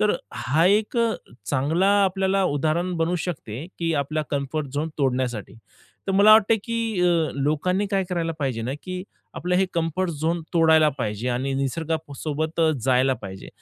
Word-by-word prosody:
तर 210 Hz, 0 st, +3 dB, 0.2 s
हा 150 Hz, +7 st, +1 dB
एक 210 Hz, +5 st, +2 dB, 0.5 s
चांगला 155 Hz, +8 st, +2 dB, 0.2 s
आपल्याला 190 Hz, +1 st, +1 dB
उदाहरण 160 Hz, +3 st, 0 dB
बनू 165 Hz, +2 st, 0 dB
शकते 140 Hz, -5 st, -5 dB
की 165 Hz, -1 st, 0 dB
आपला 155 Hz, +2 st, -2 dB
कम्फर्ट 145 Hz, +1 st, -2 dB
झोन 155 Hz, +3 st, -1 dB
तोडण्यासाठी. 125 Hz, -5 st, -1 dB, 0.5 s
तर -, -, +1 dB
मला 205 Hz, +2 st, +7 dB
वाटते 220 Hz, +1 st, +6 dB
की 230 Hz, -4 st, -2 dB
अ, 170 Hz, -3 st, +2 dB
लोकांनी 155 Hz, +8 st, 0 dB
काय 195 Hz, -2 st, +1 dB
करायला 165 Hz, -2 st, -1 dB
पाहिजे 125 Hz, -5 st, -1 dB
ना 125 Hz, +4 st, -2 dB
की 185 Hz, 0 st, -5 dB, 0.3 s
आपलं 180 Hz, +1 st, -2 dB
हे 190 Hz, +1 st, +3 dB
कम्फर्ट 170 Hz, +2 st, 0 dB
झोन 165 Hz, +3 st, -1 dB
तोडायला 160 Hz, -2 st, +5 dB
पाहिजे 110 Hz, +1 st, -2 dB
आणि 130 Hz, +2 st, -1 dB
निसर्गासोबत 155 Hz, +2 st, -3 dB, 0.2 s
जायला 130 Hz, 0 st, +3 dB
पाहिजे. 95 Hz, -5 st, -9 dB
160 Hz, 150 wpm, -24 LUFS, 135-180 Hz, 0.5 s, मला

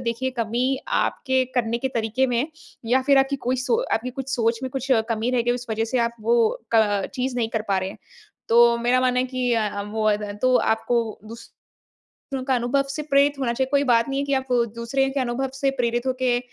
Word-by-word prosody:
देखिए 235 Hz, +3 st, -1 dB
कमी 245 Hz, +4 st, 0 dB, 0.2 s
आपके 260 Hz, 0 st, 0 dB
करने 235 Hz, -1 st, 0 dB
के 265 Hz, -, -2 dB
तरीके 230 Hz, +4 st, +1 dB
में 245 Hz, -2 st, 0 dB
है 265 Hz, -, +1 dB, 0.4 s
या 260 Hz, +1 st, +4 dB
फिर 275 Hz, 0 st, +4 dB
आपकी 270 Hz, +1 st, +2 dB
कोई 255 Hz, -, +2 dB
सो 470 Hz, +2 st, +2 dB
आपकी 250 Hz, +3 st, -1 dB
कुछ 265 Hz, -, -7 dB
सोच 230 Hz, -1 st, 0 dB
में 260 Hz, -, -3 dB
कुछ 265 Hz, +1 st, -4 dB, 0.2 s
कमी 225 Hz, +2 st, 0 dB
रह 245 Hz, -2 st, +1 dB
गई, 240 Hz, +1 st, +1 dB
उस 245 Hz, 0 st, -5 dB
वजह 225 Hz, +1 st, 0 dB
से -, -, +3 dB
आप 235 Hz, 0 st, 0 dB
वो 230 Hz, 0 st, +2 dB, 0.2 s
क 205 Hz, -3 st, +3 dB
चीज़ 255 Hz, -1 st, -2 dB
नहीं 230 Hz, -2 st, 0 dB
कर 220 Hz, -1 st, -2 dB
पा 195 Hz, -1 st, +2 dB
रहे 185 Hz, -, -2 dB
हैं। -, -, -12 dB, 0.5 s
तो 235 Hz, 0 st, +6 dB
मेरा 245 Hz, +2 st, +2 dB
मानना 250 Hz, -1 st, +2 dB
है 255 Hz, -, 0 dB
कि 250 Hz, -1 st, -1 dB
अ 225 Hz, -, +1 dB
अ, 200 Hz, 0 st, -5 dB
वो 215 Hz, +1 st, -3 dB
अद 210 Hz, 0 st, +1 dB, 0.2 s
तो 255 Hz, 0 st, +4 dB
आपको 230 Hz, +1 st, +1 dB, 0.2 s
दूसरों 230 Hz, +1 st, -14 dB, 0.7 s
का 265 Hz, -, +2 dB
अनुभव 245 Hz, +3 st, +1 dB
से 300 Hz, +2 st, -3 dB
प्रेरित 280 Hz, 0 st, +3 dB
होना 245 Hz, -3 st, 0 dB
चाहिए। 260 Hz, +2 st, 0 dB
कोई 280 Hz, 0 st, +3 dB
बात 235 Hz, -1 st, +3 dB
नहीं 275 Hz, 0 st, -1 dB
है 280 Hz, -, -1 dB
कि 280 Hz, -, -1 dB
आप 265 Hz, 0 st, -1 dB, 0.3 s
दूसरे 270 Hz, +4 st, 0 dB
के 275 Hz, 0 st, -2 dB
अनुभव 255 Hz, +1 st, -1 dB
से 270 Hz, 0 st, 0 dB
प्रेरित 240 Hz, +1 st, 0 dB
हो 260 Hz, -, +2 dB
के 245 Hz, -1 st, +2 dB
245 Hz, 230 wpm, -23 LUFS, 230-265 Hz, 0.7 s, तो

